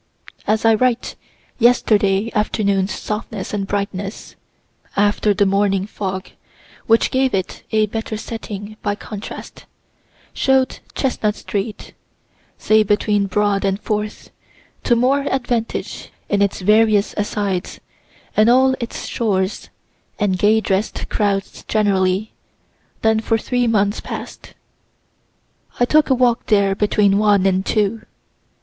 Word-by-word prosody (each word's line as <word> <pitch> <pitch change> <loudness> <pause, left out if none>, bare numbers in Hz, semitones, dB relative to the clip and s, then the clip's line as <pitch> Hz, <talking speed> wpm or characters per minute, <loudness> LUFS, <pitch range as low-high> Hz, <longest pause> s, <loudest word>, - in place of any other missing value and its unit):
As 220 +1 +1
I 225 - +6
write, 245 +2 0 0.4
yesterday 215 -3 +3
afternoon's 200 -2 0
softness 210 -2 -5
and 200 -2 -2
brightness, 200 0 -4 0.6
(after 205 +1 +2
the 205 0 +2
morning 195 -1 +1
fog, 190 -2 -5 0.6
which 225 0 +3
gave 260 -3 +1
it 190 -1 -3
a 215 -1 +3
better 220 +1 -4
setting, 215 -1 -7
by 205 -1 -1
contrast,) 210 0 -9 0.7
show'd 265 -1 +1 0.2
Chestnut 215 -6 0
street 210 +1 -5 0.6
say 215 0 +3
between 205 -1 +1
Broad 205 0 +1
and 195 0 0
Fourth 210 0 -4 0.5
to 240 - +4
more 260 +4 +2
advantage 245 -3 -2 0.2
in 205 0 +1
its 200 -1 0
various 210 +1 +3
asides, 205 -3 -2 0.6
and 215 +2 +5
all 260 +2 +5
its 235 -2 -5
stores, 195 -4 -2 0.5
and 195 -3 0
gay 215 +3 +4
dress'd 195 +1 -2
crowds 200 -2 -1
generally, 200 -1 +1 0.7
than 220 0 +3
for 225 0 +1
three 245 +2 0
months 205 -2 +1
past. - - -8 1.2
I 245 - +4
took 305 +4 +3
a 265 - +4
walk 245 -2 +1
there 200 -2 +3
between 205 0 +2
one 205 -2 +3
and 190 0 +2
two. 215 +2 0
210 Hz, 120 wpm, -19 LUFS, 200-225 Hz, 1.2 s, I